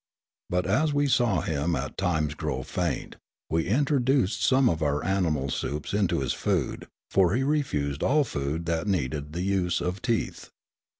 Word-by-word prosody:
But, 90 0 0
as 145 - +2
we 145 0 +3
saw 120 - +2
him 80 -1 -1
at 65 +1 -4
times 80 -6 0
grow - - -3
faint, - - -3 0.3
we 80 +1 +1
introduced 130 - +2
some 130 0 +4
of 80 -5 0
our 75 0 0
animal 80 -8 0
soups 75 +6 -3
into 100 -3 +1
his - - 0
food - - -1
— - - -41
for 95 0 +4
he 130 - +1
refused 100 - 0
all 150 +2 +3
food 75 - -3
that 85 +3 -1
needed 75 -5 -1
the 90 +2 -2
use 95 -3 +1
of 90 +2 -3
teeth. 115 -3 -2
90 Hz, 170 wpm, -27 LUFS, 75-120 Hz, 0.3 s, some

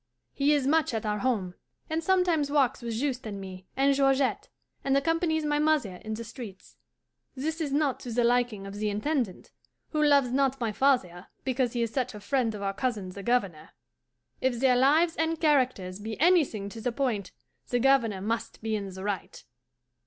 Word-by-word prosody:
He 280 +1 +2
is 285 -3 +1
much 295 -3 +2
at 220 - -3
our 210 0 -1
home, 200 -7 -1 0.3
and 320 +1 -2
sometimes 350 -5 +2
walks 270 -3 +2
with 235 -1 -4
Juste 255 -4 -2
and 200 -2 -5
me 185 -1 -9
and 275 +1 +4
Georgette, 270 -1 +1 0.3
and 275 0 +2
accompanies 320 +1 +1
my 295 0 +1
mother 300 -12 +1
in 215 +3 -5
the 230 - -6
streets. 225 -4 -10 0.6
This 315 +5 -3
is 295 -3 -2
not 285 -2 +1
to 245 - -8
the 240 +1 +1
liking 240 -4 +1
of 195 - -7
the 210 0 -1
Intendant, 215 - -2 0.4
who 305 - -1
loves 280 -4 +4
not 270 0 +1
my 230 -3 -1
father 210 -9 +1 0.2
because 255 -2 0
he 240 -1 0
is 230 - -2
such 255 -3 -1
a - - -7
friend 230 0 0
of 200 - -6
our 195 0 -1
cousin 210 -5 -2
the 200 +2 -8
Governor. 200 -9 -1 0.7
If 255 -2 0
their 260 -1 +4
lives 310 +6 +4
and 325 0 0
characters 255 - +1
be 220 +2 -6
anything 300 - +3
to 225 +2 -9
the 245 +2 -1
point 230 -7 -2 0.4
the 245 - +1
Governor 240 -6 +3
must 225 +2 -3
be 220 -1 -1
in 200 -2 -4
the 190 0 -8
right. 200 -2 -4
250 Hz, 190 wpm, -28 LUFS, 210-280 Hz, 0.7 s, and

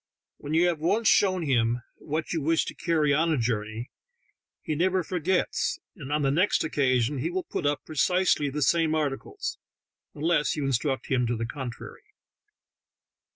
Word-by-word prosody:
When 150 +2 -4
you 170 +2 +5
have 175 -3 +1
once 200 +8 +1
shown 195 -2 +4
him 120 -4 +1
what 155 +3 -3
you 165 - -1
wish 160 +3 +2
to - - -5
carry 155 -4 +1
on 165 +3 +2
a 155 - +2
journey, 115 0 -2 0.7
he - - -2
never 185 +4 +1
forgets, 180 +2 0 0.2
and 145 -7 -8
on 150 0 +1
the 135 - +2
next 180 +8 +2
occasion 130 -3 +1
he 155 +6 -1
will 185 +1 -2
put - - -2
up 145 0 -1
precisely 160 -1 +2
the 145 +1 -1
same 165 0 +2
articles, 145 -3 -3 0.6
unless 150 -2 +1
you 150 -3 -2
instruct 135 +1 0
him 125 -2 +2
to 120 - 0
the 115 0 -2
contrary. 125 -1 -7
150 Hz, 165 wpm, -27 LUFS, 135-170 Hz, 0.7 s, you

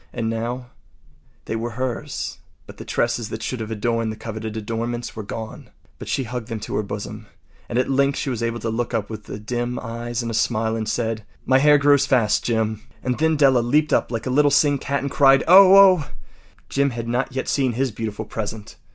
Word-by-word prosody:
And 115 -2 -2
now, 120 +2 -4 0.7
they 110 - -3
were 115 +1 -3
hers, 130 -2 -4 0.3
but - - -13
the - - -9
tresses 115 -3 -1
that 110 - -6
should 130 - -3
have 110 -1 -5
adorned 115 +1 -1
the - - -6
coveted 110 0 -6
adornments 115 +2 -4
were 110 - -5
gone. 110 +2 -7 0.3
But - - -8
she 135 - -1
hugged 120 -1 -5
them 115 -2 -4
to - - -6
her - - +1
bosom, 105 +1 -7 0.4
and 120 - -2
at 125 - +2
length 140 +1 +2
she 140 - -2
was 120 -2 -3
able 115 0 -1
to 115 - -2
look 120 +1 -2
up 110 -1 -2
with 105 -1 -8
dim 120 +1 -2
eyes 120 +1 -4
and 115 - -3
a - - -5
smile 110 0 0
and 110 -1 -3
say: 115 -1 -1 0.3
“My 130 0 +4
hair 150 +1 +6
grows 140 -1 +4
so 140 - 0
fast, 120 -6 +2
Jim!” 110 -2 -1 0.2
And 125 -1 -1
then 160 0 +3
Della 135 -4 +4
leaped 150 +6 +2
up - - +1
like 115 -1 -3
a 130 - -1
little 145 +2 +4
singed 145 0 +3
cat 140 +1 -1
and 140 - -3
cried, 135 -1 +5
“Oh, 190 +2 +9
oh!” 185 -6 +7 0.6
Jim 140 0 +1
had 115 -2 -5
not 125 +2 -1
yet 130 - -2
seen 130 -3 +1
his 130 +2 -1
beautiful 110 0 -5
present. 110 -1 -6
120 Hz, 220 wpm, -22 LUFS, 110-135 Hz, 0.7 s, Oh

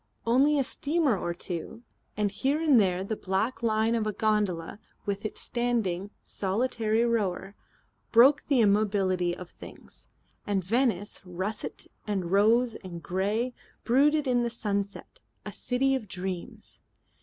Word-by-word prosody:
Only 270 +6 +4
a 275 - +3
steamer 285 0 +1
or 175 -2 -3
two, 180 +6 -6 0.3
and 210 -1 +1
here 270 +8 0
and 300 -7 +5
there 185 -2 +1
the 220 +3 -3
black 215 +5 -2
line 220 0 +2
of 225 -2 0
a - - 0
gondola 205 -5 0 0.3
with 200 0 -2
its 215 - -5
standing, 225 -6 -1
solitary 220 +2 0
rower, 200 -4 -1 0.6
broke 260 +5 +6
the 275 -4 +3
immobility 195 -4 +2
of 180 -2 -10
things. - - -13 0.4
And 200 -2 0
Venice, 225 +1 0
russet 190 +4 -4 0.2
and 190 -4 -2
rose 225 +4 +4
and 175 -5 -9
grey, 205 +9 -1 0.3
brooded 295 +5 +3
in 250 -2 +2
the 240 - 0
sunset, 205 - -4 0.2
a - - -5
city 270 +2 0
of 255 -5 -2
dreams. 180 -2 -6
215 Hz, 140 wpm, -28 LUFS, 190-245 Hz, 0.6 s, broke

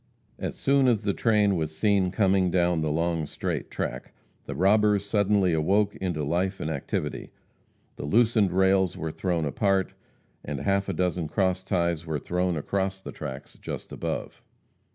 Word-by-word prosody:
As - - -4
soon 135 -1 +3
as 115 -4 +2
the 100 -1 +1
train 105 -3 +2
was 80 -2 -3
seen 100 -3 +2
coming 95 -1 +2
down 85 -2 +2
the 80 - 0
long 80 0 0
straight - - -4
track, - - -5 0.3
the - - -5
robbers 105 +2 +3
suddenly 100 -3 +2
awoke 100 +6 +2
into 90 -5 -2
life 90 +6 -1
and 80 - -2
activity. 70 -3 -3 0.7
The - - -5
loosened 110 +2 +3
rails 95 0 +3
were 80 -1 -3
thrown 85 -2 -1
apart, 95 +5 +1 0.5
and 70 -1 -4
half 100 0 +1
a - - -1
dozen 90 -1 -1
cross 95 +3 0
ties 85 -3 0
were 80 -2 -2
thrown 90 +3 -1
across 95 +5 -2
the - - -8
tracks 70 -3 -8
just - - -6
above. - - -4
95 Hz, 160 wpm, -26 LUFS, 80-100 Hz, 0.7 s, soon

